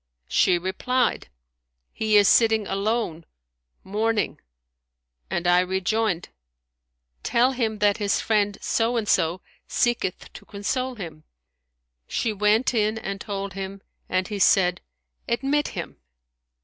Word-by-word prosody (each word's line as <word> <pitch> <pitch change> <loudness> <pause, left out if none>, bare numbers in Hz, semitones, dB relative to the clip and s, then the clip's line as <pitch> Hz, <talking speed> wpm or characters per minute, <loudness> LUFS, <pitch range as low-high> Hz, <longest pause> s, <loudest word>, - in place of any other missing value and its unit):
She 175 - +3
replied, 215 +8 -1 0.6
He 215 -1 +2
is 205 -1 +6
sitting 220 -2 +4
alone, 195 -4 -1 0.6
mourning;' 215 +2 -1 0.9
and 175 - -2
I 175 0 +5
rejoined, 190 +1 0 0.9
Tell 245 +3 +2
him 225 -4 -1
that 205 -1 +2
his 205 -2 0
friend 205 -2 +1
so 235 +1 +1
and 220 -2 -1
so 170 +1 +2 0.3
seeketh 240 -7 -1
to - - -11
console 255 +5 -3
him.' 165 -7 -8 0.8
She 225 - -1
went 210 +5 +2
in 215 -1 +1
and 195 -2 -5
told 200 -1 -4
him; 195 0 -6 0.3
and 185 0 0
he 205 -2 -4
said, 180 -2 +4 0.5
Admit 275 +5 +1
him.' - - -5
210 Hz, 120 wpm, -24 LUFS, 190-225 Hz, 0.9 s, is